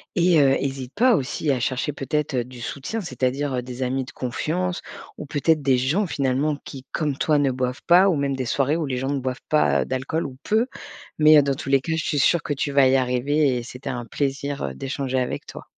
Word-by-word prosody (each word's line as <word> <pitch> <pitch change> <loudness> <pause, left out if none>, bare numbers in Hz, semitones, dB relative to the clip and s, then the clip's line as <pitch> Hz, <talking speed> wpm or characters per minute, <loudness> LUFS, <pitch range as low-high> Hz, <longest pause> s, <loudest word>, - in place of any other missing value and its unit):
et 175 -3 +4
heu, 135 -2 +5
hésite 135 -2 -4
pas 240 +3 +5
aussi 145 +2 -1
à 130 - 0
chercher 130 +4 -1
peut-être, 145 0 -2
heu, 125 - +1
du 125 -1 -11
soutien, 145 - -4
c'est-à-dire, 135 - -2
heu, 125 - -1
des 125 +1 -5
amis 130 +1 -1
de - - -11
confiance 175 +8 -2 0.4
ou - - -7
peut-être 150 +2 +1
des 135 -2 +3
gens, 150 +11 +1
finalement, 140 0 0
qui, 130 -1 -9
comme 150 -4 -1
toi, 150 0 +2
ne 140 -2 +2
boivent 125 0 -3
pas 180 +3 +6
ou 185 - +3
même 140 -1 0
des 130 - -2
soirées 140 +5 +1
où 165 - -1
les 135 -2 -2
gens 130 +2 -2
ne 140 -1 0
boivent 130 0 -4
pas, 155 0 +3
heu, - - -1
d'alcool 130 +5 -2
ou 130 -2 -8
peu 220 +3 +2 0.5
mais 155 -1 +8
dans 140 0 +1
tous - - -8
les 135 -1 +4
cas, 165 - -4
je 160 - -2
suis 150 - 0
sûre 170 +4 +3
que 145 - -2
tu 140 +1 -2
vas 140 -1 +5
y 130 - +4
arriver 130 +2 +1
et 120 - -4
c'était 125 +3 -8
un 120 -2 -4
plaisir, 140 +2 -2
heu, 65 - -3
d'échanger 130 - -2
avec 125 - -3
toi. - - -10
140 Hz, 240 wpm, -23 LUFS, 130-150 Hz, 0.5 s, mais